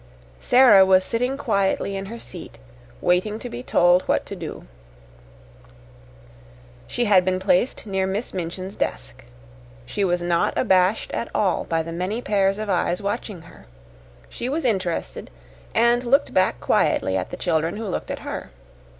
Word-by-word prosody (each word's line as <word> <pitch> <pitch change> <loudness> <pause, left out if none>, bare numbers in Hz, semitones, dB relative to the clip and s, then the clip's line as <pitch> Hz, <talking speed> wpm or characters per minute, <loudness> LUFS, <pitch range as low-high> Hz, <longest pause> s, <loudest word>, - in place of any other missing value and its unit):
Sara 245 -7 +6
was 190 0 +4
sitting 250 +4 -1
quietly 200 -5 0
in 195 0 -5
her 230 +3 -7
seat, - - -10 0.4
waiting 185 +4 +1
to 245 +1 -8
be 245 - -6
told 175 -6 +4
what - - +1
to - - -7
do. - - -8 2.2
She 240 - -1
had 195 -4 +5
been 185 0 0
placed 190 +6 +1
near 190 -2 -1
Miss 200 +5 -3
Minchin's 185 +2 -5
desk. - - -4 0.6
She 200 - -2
was 175 -2 0
not 175 -1 0
abashed 185 +3 +2
at 230 - -3
all 190 -4 +1
by 165 -1 -1
the 165 - -7
many 185 +7 -3
pairs 195 -4 +1
of 215 0 -4
eyes 180 -2 0
watching 200 -3 -4
her. 165 - -16 0.6
She 245 - -5
was 300 +1 -2
interested 185 - -2 0.5
and 235 +2 +3
looked 275 +4 +2
back 185 0 +2
quietly 95 - +1
at 95 -1 -2
the - - -7
children 165 +4 -1
who 225 - -5
looked 190 - -4
at - - -5
her. - - -5
195 Hz, 160 wpm, -23 LUFS, 180-225 Hz, 2.2 s, Sara